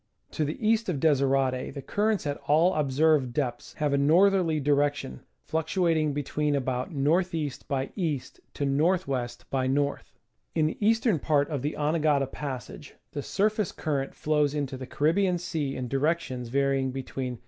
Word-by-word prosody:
To 155 - -1
the 150 - -3
east 225 -1 +2
of 155 -6 -1
Desirade 135 -3 +1
the 140 - -5
currents 210 +2 0
at 145 -1 -2
all 165 +5 +4
observed 145 -2 +2
depths 120 -3 -3
have 150 -2 -1
a 140 - +3
northerly 170 +2 +4
direction, 145 - 0 0.2
fluctuating 160 -1 +1
between 145 +1 -1
about 130 0 -1
N. 140 -5 -1 0.2
E. 155 -4 -1 0.2
by 135 -1 -2
E. 160 -8 0 0.4
to - - -2
N. 140 0 +1
W. 150 -7 +1 0.2
by 130 -1 0
N. 140 +2 +1 0.6
In 155 - +3
the 155 - -2
eastern 225 -4 +3
part 145 0 +1
of 145 -4 -2
the 150 +3 -2
Anegada 150 -2 +2
Passage 140 0 -7 0.2
the 145 - -4
surface 210 +4 0
current 140 -3 -3
flows 150 -1 +1
into 140 -3 -2
the 130 -1 -7
Caribbean 175 +6 +2
Sea 150 -5 -3
in 130 -1 -4
directions 135 -3 -1
varying 135 0 +1
between 130 -1 -4
S. 120 - -11
145 Hz, 165 wpm, -27 LUFS, 135-160 Hz, 0.6 s, all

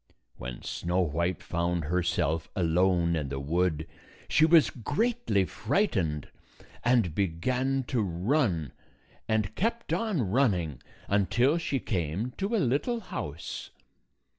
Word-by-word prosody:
When - - -7
Snow 90 +2 -1
White 85 +1 -1
found 85 0 -1
herself 85 -2 0
alone 85 -1 +2
in 75 -4 -2
the 70 0 -3
wood, 80 +2 0 0.4
she 155 - +4
was 165 -2 +6
greatly 145 - 0
frightened, 95 - 0 0.6
and 115 -8 +3
began 125 +10 0
to 130 - 0
234 85 -5 -3
run, 95 - +2 0.6
and 110 -2 0
kept 230 - -1
on 215 - 0
running 90 - +1 0.3
until 120 - +2
she 140 -4 -1
came 95 +4 -2
to 200 +4 0
a - - +3
little 150 - +1
house. 80 - -6
95 Hz, 120 wpm, -29 LUFS, 85-135 Hz, 0.6 s, was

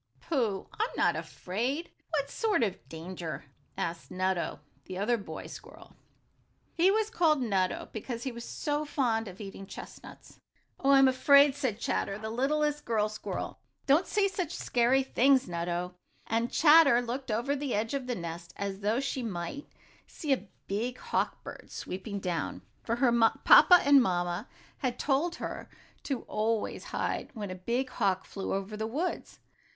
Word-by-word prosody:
"Pooh, 225 - -1
I'm 445 +3 +1
not - - +3
afraid! 250 - -3 0.2
What 285 -3 -1
sort 435 - +1
of 200 -5 -3
danger?" 165 -1 -6 0.3
asked 170 0 -3
Nutto, 185 -3 -1 0.3
the 185 - -6
other 215 +5 +2
boy 205 -4 -7
squirrel. - - -12 0.8
He 345 +3 +4
was 435 +2 +1
called 320 - +3
Nutto 195 -7 0
because 230 +2 -5
he 265 - -2
was 235 0 -8
so 295 +3 -2
fond 240 -7 0
of 190 0 -10
eating 195 -1 -8
chestnuts. - - -11 0.4
"Oh, 275 - +1
I'm 270 -1 +7
afraid," 280 +2 +6
said 260 -7 -2
Chatter, 195 -4 -1
the 220 +1 -5
littlest 295 +4 0
girl 215 -2 +1
squirrel. 215 +1 -5 0.3
"Don't 290 +7 +4
say 410 -2 +2
such 360 -3 -3
scary 245 +3 +2
things, 265 0 +3
Nutto," 175 +1 -3 0.3
and 230 +2 0
Chatter 300 -5 +7
looked 255 +2 -4
over 235 +6 0
the 280 -4 -2
edge 220 +4 -1
of 270 -2 -2
the 250 - -1
nest 170 -1 -7
as 195 -1 -3
though 210 +4 +1
she 275 -1 -2
might 210 - -5 0.4
see 295 -3 -1
a 230 -6 -3 0.2
big 230 +6 -2
hawk - - -2
bird - - -10
swooping 200 +2 -5
down, 145 - -3 0.2
for 230 - -1
her 245 0 +3 0.3
papa 485 -8 +9
and 280 -1 +7
mamma 175 -1 -1 0.3
had 255 -4 -1
told 305 +5 +1
her - - -6 0.3
to 270 -4 -3
always 220 +1 -1
hide - - -2
when 205 -4 -5
a 185 0 -9
big 255 +2 0
hawk 190 -1 0
flew 195 - -5
over 195 +2 -4
the 220 +1 -3
woods. 310 +11 -3
235 Hz, 160 wpm, -30 LUFS, 195-280 Hz, 0.8 s, papa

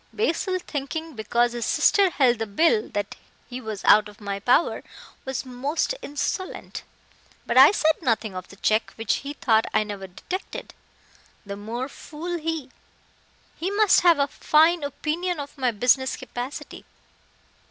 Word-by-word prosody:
Basil, 375 -3 0
thinking 320 -1 -5
because 235 +1 +1
his 240 -2 -3
sister 395 -2 +4
held 255 -8 +2
the 225 - -2
bill 220 +1 +2
that 205 0 -3 0.3
he 255 +1 -7
was 220 -4 -6
out 210 0 +6
of 205 - -17
my 200 -1 -4
power, 245 - +2 0.4
was 265 0 -3
most 275 - -2
insolent. 370 +3 -4 0.6
But - - -2
I - - +10
said 315 -6 +1
nothing 225 -4 0
of 185 -1 -7
the - - -14
check 215 +3 0
which 225 - 0
he 285 +1 -6
thought 225 -6 +2
I - - +4
never 200 -2 -7
detected. 365 - -7 0.7
The 200 0 -6
more 230 +5 -5
fool 335 +4 -6
he. 315 -4 -4 0.9
He 355 - -1
must 410 0 +4
have 345 -3 +5
a 280 - +3
fine 320 +4 +3
opinion 315 +5 -2
of 285 0 -7
my 260 -3 +1
business 250 +3 +2
capacity. 250 +1 -7
265 Hz, 155 wpm, -24 LUFS, 220-325 Hz, 0.9 s, I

